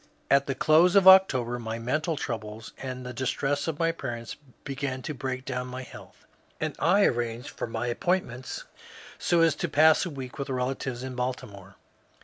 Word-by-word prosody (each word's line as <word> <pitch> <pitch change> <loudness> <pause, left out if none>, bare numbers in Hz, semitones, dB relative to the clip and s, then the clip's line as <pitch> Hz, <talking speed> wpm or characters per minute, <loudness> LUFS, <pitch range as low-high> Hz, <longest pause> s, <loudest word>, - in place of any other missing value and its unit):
At 140 0 +4
the 135 - -1
close 160 +7 +4
of 195 -1 +6
October 130 -11 +6
my 115 -1 -4
mental 150 +7 -1
troubles 110 -4 -5
and 130 -1 -6
the 125 - -6
distress 135 +3 -1
of 160 -3 -2
my 165 0 +2
parents 120 -7 -6 0.3
began 135 -2 -4
to 150 - -4
break 130 -1 -4
down 125 -1 -3
my 130 +1 -6
health, - - -14 0.3
and - - -2
I 200 +2 +4
arranged 120 0 -1
for - - -5
my 115 +1 -2
ap - - -6
pointments 130 -9 -2 0.6
so 170 -1 +2
as 165 -1 +5
to 175 - -2
pass 155 +2 +5
a 175 - -3
week 135 -1 -8
with 140 0 -4
relatives 130 -1 -3
in 130 -1 -5
Baltimore. 105 -6 -5
130 Hz, 180 wpm, -27 LUFS, 120-155 Hz, 0.6 s, of